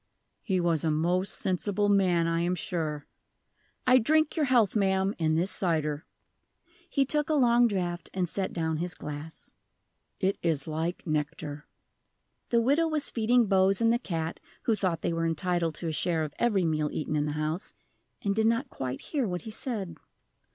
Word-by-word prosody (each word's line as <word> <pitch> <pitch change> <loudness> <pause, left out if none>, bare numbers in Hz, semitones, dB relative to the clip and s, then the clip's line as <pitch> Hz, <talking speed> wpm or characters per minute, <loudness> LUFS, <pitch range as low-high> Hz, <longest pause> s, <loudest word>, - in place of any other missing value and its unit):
"He 190 -4 0
was 170 -3 +1
a 160 - +1
most 175 +5 +1
sensible 200 +2 +1
man, 185 -4 +3
I 165 0 0
am 175 +1 0
sure. 155 -4 -3 0.8
I 255 0 +6
drink 310 +5 +2
your 310 -3 +2
health, 240 -7 +3
ma'am, 190 -1 +2
in 155 -1 +2
this 180 +4 +3
cider." 155 -5 -1 0.8
He 275 -2 +2
took 300 +3 +1
a 310 - +2
long 240 -3 +5
draught, 175 -5 -3
and 185 -2 -1
set 190 +3 -3
down 160 -2 -1
his 175 +2 -2
glass. 150 +2 -6 0.7
"It 195 +1 0
is 160 -5 0
like 160 +3 -3
nectar." 150 -1 -3 0.8
The 235 -1 +3
widow 285 +7 +3
was 305 -3 -1
feeding 235 +1 +3
Bose 195 -1 +3
and 230 0 +4
the 240 - +1
cat 165 -7 -4 0.2
(who 230 - +2
thought 185 -6 -1
they - - 0
were 165 0 0
entitled 165 0 -1
to 170 - -5
a - - -1
share 160 +1 +1
of 150 -2 -5
every 210 -7 +2
meal 155 -2 0
eaten 155 0 -3
in 150 0 +1
the 150 - -2
house), 155 +4 -3 0.5
and 200 - +1
did 220 +2 +3
not 230 +4 0
quite 130 0 -4
hear 275 -7 -2
what 180 -2 -4
he 220 - -7
said. 205 -8 -4
180 Hz, 180 wpm, -28 LUFS, 160-220 Hz, 0.8 s, I